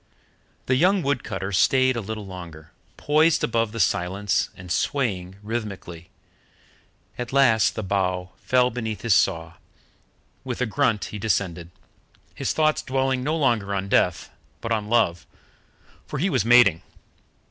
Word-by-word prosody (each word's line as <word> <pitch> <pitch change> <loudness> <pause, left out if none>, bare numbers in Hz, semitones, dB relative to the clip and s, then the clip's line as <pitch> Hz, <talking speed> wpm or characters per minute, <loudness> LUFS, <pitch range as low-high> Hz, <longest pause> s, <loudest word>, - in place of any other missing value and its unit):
The 130 - +1
young 185 +6 +3
wood 140 -2 0
cutter 95 +1 -4
stayed 130 +6 +3
a 120 - -2
little 110 0 -6
longer, 85 -5 -10 0.3
poised 155 +2 +2
above 115 -2 0
the 115 - -6
silence 100 -1 0
and 90 -1 -10
swaying 95 -5 -1
rhythmically. 100 -7 -6 1.1
At 120 -1 -4
last 125 -6 +3
the 110 - -4
bough 95 -2 -1
fell 125 -1 +2
beneath 110 -4 -4
his 115 -3 +3
saw. 80 -2 +1 0.9
With 125 -2 -5
a 125 - +1
grunt, 110 0 0
he 105 - -5
descended, 90 -5 -1 0.6
his - - -2
thoughts 155 -1 +1
dwelling 130 -1 -1
no 155 +4 0
longer 115 -9 +1
on 100 0 -3
death, - - +1 0.3
but 115 - -6
on 105 -2 -1
love, 110 -8 +1 0.8
for - - -5
he 185 +7 0
was 125 -9 +1
mating. 115 -8 +5
110 Hz, 145 wpm, -24 LUFS, 95-130 Hz, 1.1 s, mating